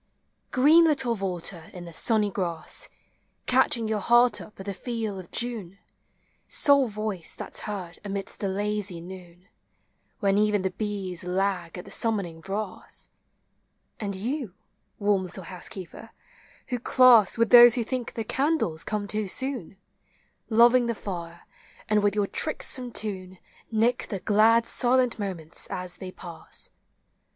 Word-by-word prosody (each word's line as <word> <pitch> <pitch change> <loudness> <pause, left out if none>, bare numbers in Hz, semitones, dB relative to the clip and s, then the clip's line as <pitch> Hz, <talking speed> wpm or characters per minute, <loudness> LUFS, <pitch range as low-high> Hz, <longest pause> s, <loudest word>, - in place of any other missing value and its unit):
Green 305 +6 +6
little 270 -6 +2
vaulter 180 -4 -3
in 180 -1 -8
the 170 - -10
sunny 210 +2 +1
grass, 180 - -2 0.6
Catching 250 -3 +2
your 215 -1 0
heart 240 +4 +4
up 210 - -13
at 190 - -8
the 200 - -3
feel 220 -2 -4
of 180 - -11
June, 220 -6 -3 0.4
— - - -40 0.2
Sole 280 -2 +6
voice 210 -5 -4
that - - -8
's - - -1
heard 185 -5 -6
amidst 200 -1 -5
the 200 - -1
lazy 205 -2 -2
noon, 180 +1 -12 0.7
When 200 -1 +2
even 210 -2 +2
the 190 - 0
bees 195 -4 -4
lag 180 -2 -1
at 180 - -8
the - - -12
summoning 195 -8 -1
brass; 195 +1 -5 0.9
And 200 -2 -3
you, 235 - -4 0.4
warm 200 -2 +1
little 185 +1 -6
housekeeper, 185 +4 -7 0.6
who 245 -1 -2
class 240 -5 +6
With 230 0 +2
those 240 -1 +10
who 240 - 0
think 250 +1 -4
the 225 - -2
candles 265 - 0
come 210 +1 -3
too 215 0 -2
soon, 250 - -3 0.7
Loving 235 +2 +5
the 235 - -1
fire, 170 -4 -7 0.5
and 215 -1 +3
with 205 0 +1
your 205 -1 +2
tricksome 255 0 0
tune 190 -4 -4 0.3
Nick 225 +2 +1
the 195 - -3
glad 220 +4 +4
silent 250 0 +2
moments 175 -6 -4
as 180 -1 -5
they 185 - -7
pass! 170 -3 -7
205 Hz, 145 wpm, -26 LUFS, 185-235 Hz, 0.9 s, those